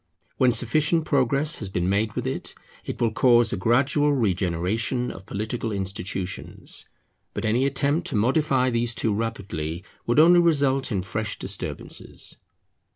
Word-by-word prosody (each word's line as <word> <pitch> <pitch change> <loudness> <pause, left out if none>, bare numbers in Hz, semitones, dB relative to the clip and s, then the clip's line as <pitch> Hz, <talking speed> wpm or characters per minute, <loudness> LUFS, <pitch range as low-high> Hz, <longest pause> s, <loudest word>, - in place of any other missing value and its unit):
When 130 -1 +4
sufficient 150 +7 +2
progress 140 +3 +2
has 100 - -5
been 90 -1 -1
made 105 +3 +1
with - - -3
it, - - -4 0.3
it - - -6
will 115 -2 +2
cause 120 0 +4
a - - +1
gradual 130 +9 +2
regeneration 100 +2 0
of 95 - -11
political 110 +2 -3
institutions. 95 -1 -5 0.5
But - - -3
any 120 +5 +2
attempt 145 +5 0
to 140 - -3
modify 130 +3 +2
these 120 0 0
too 110 - 0
rapidly 100 -7 -3 0.2
would 120 - +1
only 175 +3 +7
result 140 -6 +2
in 95 -3 -1
fresh 105 +3 -3
disturbances. - - -5
115 Hz, 145 wpm, -25 LUFS, 100-140 Hz, 0.5 s, only